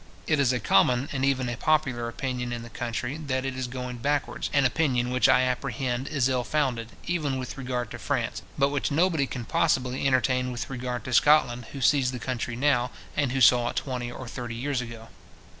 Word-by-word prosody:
It 155 -2 +2
is 135 -3 +4
a 125 - 0
common 125 +6 +3
and 135 -2 -2
even 135 -2 +1
a 120 - -2
popular 135 -3 +1
opinion 125 0 -3
in 120 -1 -4
the 115 - -11
country, 120 +4 -3
that 135 -4 -2
it 135 -1 -3
is 130 -1 -3
going 125 0 -5
backwards; 145 +4 -1
an 140 -2 +3
opinion 125 -2 +1
which 130 +1 +3
I 130 - +6
apprehend, 130 0 -1
is 140 -4 +1
ill 130 -2 0
founded, 125 -6 -1
even 155 -6 -1
with 130 -1 -5
regard 125 -3 -3
to - - -7
France, - - -2 0.2
but 140 - +3
which 145 -1 -1
nobody 160 -2 +2
can 125 -3 -5
possibly 130 +3 +1
entertain 130 -1 +2
with 125 +2 -5
regard 125 -1 -4
to 130 - -5
Scotland, 125 -4 +4
who 140 - -6
sees 130 -1 +3
the 125 - -5
country 120 -1 -3
now, 125 -2 +2 0.3
and 140 -4 +1
who 135 0 -1
saw 120 0 +6
it - - -6
twenty 125 -3 -3
or 130 - -8
thirty 120 -1 -6
years 130 +2 -1
ago. 115 -1 -9
130 Hz, 210 wpm, -27 LUFS, 120-140 Hz, 0.3 s, I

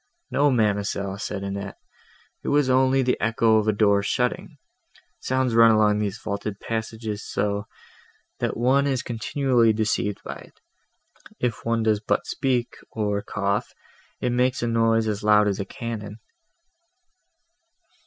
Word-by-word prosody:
"No, 145 +1 +3
ma'amselle," 100 -4 0
said 100 -2 -4
Annette, 100 0 -5 0.6
"it - - -9
was 145 -2 +2
only 130 +1 +3
the 125 - 0
echo 115 0 +3
of 110 0 0
a - - +5
door 100 -1 +3
shutting; 125 +4 -2 0.6
sound 130 -1 0
runs 115 0 +7
along 105 -1 +3
these 105 0 -2
vaulted 100 -1 -5
passages 110 -1 -4
so, 100 0 -2 0.7
that - - -2
one 135 +4 +3
is 130 -2 -1
continually 120 0 +1
deceived 105 -2 -1
by - - -6
it; - - -17 0.8
if 125 -2 -2
one 115 -1 +1
does 110 -2 +2
but 105 - -1
speak, 125 -3 -1
or 105 -2 -1
cough, 100 0 -2 0.4
it 125 - -1
makes 125 +1 +1
a - - 0
noise 115 -1 +2
as 105 -1 -2
loud 105 0 +5
as 100 -2 -1
a 100 - -2
cannon." 105 -1 -6
110 Hz, 145 wpm, -24 LUFS, 105-120 Hz, 0.8 s, runs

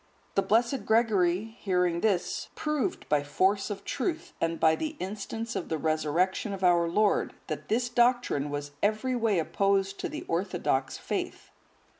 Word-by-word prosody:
The 195 - +3
blessed 235 +6 +1
Gregory 205 -5 +3 0.2
hearing 180 -3 +1
this, 200 -5 0
proved 305 +4 -2
by 150 -1 +2
force 190 +8 +1
of 200 -1 -5
truth, 355 0 -3
and 165 0 0
by 160 0 +5
the 310 - -4
instance 215 +4 -4
of 180 - -3
the 160 - 0
Resurrection 160 +7 0
of 190 -1 -6
our 175 -2 +4
Lord, 205 +3 +2
that - - -6
this 240 +3 +1
doctrine 240 - +2
was 145 0 -4
every 215 +5 +1
way 225 -5 +1
opposed 195 +3 +1
to - - -3
the 305 +1 -6
orthodox 165 -7 -1
faith. - - -4
195 Hz, 155 wpm, -28 LUFS, 170-230 Hz, 0.2 s, by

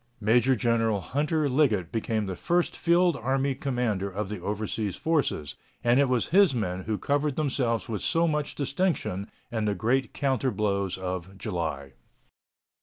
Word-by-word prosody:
Major 120 +5 +3
General 115 -2 +1
Hunter 150 - 0
Liggett 125 - +2
became 110 -1 -1
the 95 -1 -4
first 175 - 0
field 175 0 +3
army 135 +2 0
commander 120 -7 -1
of 100 +1 -4
the 105 -2 -4
overseas 105 0 -2
forces, 145 - 0 0.3
and 120 +2 +4
it 140 -2 +3
was 125 -2 +1
his 185 -5 +5
men 90 -5 -2
who 110 -1 -1
covered 145 +2 0
themselves 130 -6 0
with 110 -3 -3
so 170 0 +2
much 150 -2 -1
distinction 140 - -1 0.2
in 110 -2 -1
the 105 -1 0
great 120 +7 +1
counter 135 -2 0
blows 100 -4 -1
of 95 0 -5
July. 80 -9 -4
115 Hz, 155 wpm, -27 LUFS, 100-140 Hz, 0.3 s, his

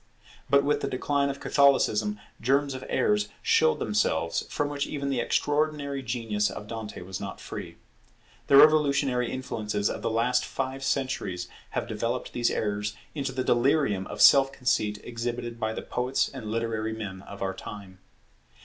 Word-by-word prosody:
But 140 0 +5
with 145 0 +1
the - - -1
decline 140 +2 0
of 140 - -4
Catholicism, 110 -7 +3 0.2
germs 135 +3 +2
of 130 0 -6
errors 210 0 +1
showed 460 0 +4
themselves, - - 0
from 145 - -1
which 145 -1 -2
even 140 -1 -3
the 130 - 0
extraordinary 145 0 0
genius 115 -4 -1
of 105 - -7
Dante 110 -2 -6
was 95 +1 -6
not - - -6
free. - - -7 0.7
The 140 - +7
revolutionary 140 -5 +5
influences 105 -5 -2
of - - -5
the - - -1
last 115 +3 +2
five 135 0 -4
centuries 130 -10 -2 0.3
have - - 0
developed 115 +2 -3
these 120 -1 +1
errors 105 0 -2 0.2
into 140 -3 -2
the 130 0 -2
delirium 120 -6 +2
of - - -5
self 135 -1 +7
conceit 110 -5 0
exhibited 120 0 -4
by 110 -1 -1
the - - -5
poets 125 +2 0
and 125 -5 -7
literary 110 -1 -2
men 100 -4 -6
of 100 0 -8
our 95 0 -1
time. 95 -1 -9
125 Hz, 160 wpm, -27 LUFS, 105-140 Hz, 0.7 s, The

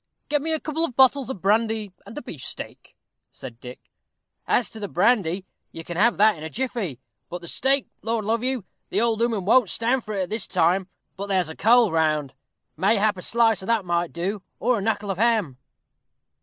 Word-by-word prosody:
"Get 295 -1 +2
me 320 +2 -2
a 315 - +1
couple 315 +2 -1
of 275 -8 0
bottles 265 0 +4
of 205 -9 -6
brandy 220 0 +1 0.2
and 215 - -10
a 295 - -5
beefsteak," 150 - -8 0.3
said 120 -3 -11
Dick. 125 0 -12 0.6
"As 240 - +2
to 220 - -8
the 205 - -3
brandy, 190 -2 +1 0.3
you 165 - -8
can 175 - -7
have 225 +7 +3
that 215 0 +5
in 155 - -10
a 160 - -5
jiffy 220 - -3 0.3
but 175 0 -6
the 170 - -10
steak, 270 - +1 0.2
Lord 225 -1 -2
love 225 +2 0
you, 255 -5 -1 0.2
the - - 0
old 230 -1 +1
ooman 225 -5 0
won't 230 0 +4
stand 245 +3 0
it 215 - -2
at 185 -2 -2
this 220 -1 -3
time; 180 +3 +2 0.3
but 200 +1 -4
there's 185 -4 +1
a 160 - -7
cold 230 -3 +4
round, 155 -4 +1 0.4
mayhap 205 +3 +2
a 180 - -8
slice 225 0 +2
of 190 - -8
that 225 -4 +1
might 175 -1 0
do 190 +4 -3 0.2
or 245 +1 +1
a - - -4
knuckle 205 -1 -1
of 190 - -5
ham?" 220 - +1
210 Hz, 205 wpm, -24 LUFS, 180-235 Hz, 0.6 s, that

